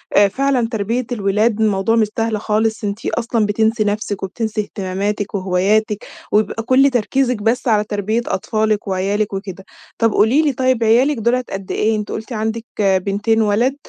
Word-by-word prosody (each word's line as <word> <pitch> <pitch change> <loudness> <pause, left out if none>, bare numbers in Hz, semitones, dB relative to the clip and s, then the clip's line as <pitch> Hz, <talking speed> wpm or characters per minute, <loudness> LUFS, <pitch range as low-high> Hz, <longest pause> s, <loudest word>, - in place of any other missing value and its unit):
آآ، 205 0 +6
فعلًا 260 +2 0
تربية 230 +3 -1
الولاد 210 0 +1
الموضوع 210 +1 +2
مش 220 -2 +3
سهل 225 -1 0
خالص، 220 +1 0
أنتِ 205 +2 -4
أصلًا 230 -2 0
بتنسي 220 +2 +1
نَفسِك 205 -1 -2
وبتنسي 215 +3 -2
اهتماماتِك 205 +1 -3
وهواياتِك، 200 +3 0 0.3
وبيبقى 215 +1 +1
كل 260 +4 +4
تركيزِك 250 -1 0
بس 245 +3 0
على 215 -3 +3
تربية 210 +2 -1
أطفالِك 215 +2 -1
وعيالِك 200 +2 -1
وكده. 195 -1 -6 0.3
طب 230 -1 +2
قولي 225 +9 +3
لي 300 -3 +1
طيّب 255 -2 +1
عيالِك 245 +6 +3
دُولة 240 +3 +1
قد 195 -1 -6
إيه؟ 220 +1 +1
أنتِ 210 -1 -5
قلتِ 220 +3 -5
عندِك 220 +1 -3 0.2
بِنتين 200 +3 +1
وولد، 220 +6 +2
215 Hz, 160 wpm, -18 LUFS, 205-230 Hz, 0.3 s, آآ